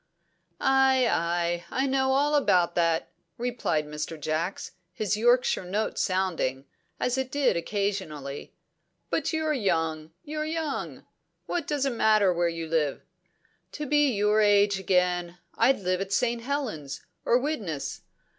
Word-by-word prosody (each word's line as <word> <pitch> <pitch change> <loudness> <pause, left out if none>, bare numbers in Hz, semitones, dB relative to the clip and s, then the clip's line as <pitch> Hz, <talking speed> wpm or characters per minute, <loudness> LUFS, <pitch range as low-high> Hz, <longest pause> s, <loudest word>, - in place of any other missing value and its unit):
"Ay, 265 -2 +4
ay! 170 -2 0
I 265 - 0
know 265 0 +1
all 290 +2 +2
about 180 -12 +3
that," 165 -1 +1 0.3
replied 235 -11 -1
Mr. 150 +1 -5
Jacks, 155 +5 -2 0.2
his 210 +3 -1
Yorkshire 240 0 +3
note 205 +5 -2
sounding, 175 -8 -1 0.3
as 250 +1 0
it 265 -1 -2
did 285 -2 +2
occasionally. 170 -7 -3 0.6
"But 320 0 0
you're 315 -1 0
young, 160 - -1
you're 305 +1 -4
young; 315 -2 -4 0.4
what 345 -4 -2
does 290 -2 0
it 270 - +1
matter 215 -4 +4
where 175 0 +1
you 165 -1 -4
live? 155 -3 0 0.7
To 300 - -4
be 295 -1 +3
your 210 +1 +3
age 205 -1 +4
again, 180 -2 +1 0.2
I'd 240 -1 +3
live 185 0 0
at 195 0 -4
St. 235 +3 +1
Helens, 230 - -3 0.2
or 240 - +4
Widnes. 190 - -3
200 Hz, 135 wpm, -27 LUFS, 170-265 Hz, 0.7 s, Ay